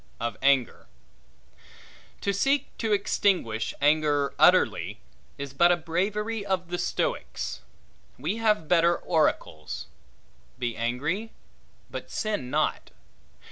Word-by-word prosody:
Of 120 0 -2
Anger 135 -3 +2 1.3
TO 200 - 0
SEEK 275 +8 +1
to 225 -2 -1
extinguish 185 - +1
anger 145 -1 +2
utterly, - - +4 0.4
is 140 -1 -6
but 170 +5 +5
a 175 - +3
bravery 205 +7 -2
of 190 -3 -2
the 175 0 -2
Stoics. - - -2 0.6
We 210 - -2
have 210 -7 +1
better 170 0 +4
oracles: 160 - -1 0.7
Be 120 -2 -2
angry, 150 - -2 0.6
but - - -6
sin 210 - -2
not. - - 0
170 Hz, 105 wpm, -27 LUFS, 140-205 Hz, 1.3 s, but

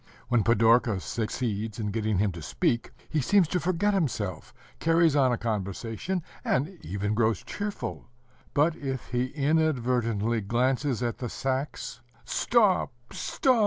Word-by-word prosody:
When 120 -3 +3
Pidorka 115 -1 +4
succeeds 110 0 -3
in 105 -3 -2
getting 110 -1 0
him 100 +1 +2
to 85 -2 -8
speak, 115 +9 0 0.2
he 155 - 0
seems 195 +5 +4
to 180 - +1
forget 185 +4 +1
himself, 110 - -1 0.3
carries 165 -2 +4
on 135 -3 +4
a 120 - +1
conversation, 115 - -3 0.2
and 160 +8 0
even 100 +3 -2
grows 110 0 +1
cheerful; 205 -9 -5 0.5
but 155 +3 +3
if 135 -5 -5
he 125 0 +1
inadvertently 125 -7 +1
glances 125 +4 0
at 120 -1 -2
the 120 - -3
sacks, 135 -1 -3 0.2
"Stop, 215 -6 +3 0.2
stop! 255 -3 +1
125 Hz, 135 wpm, -28 LUFS, 110-155 Hz, 0.5 s, Pidorka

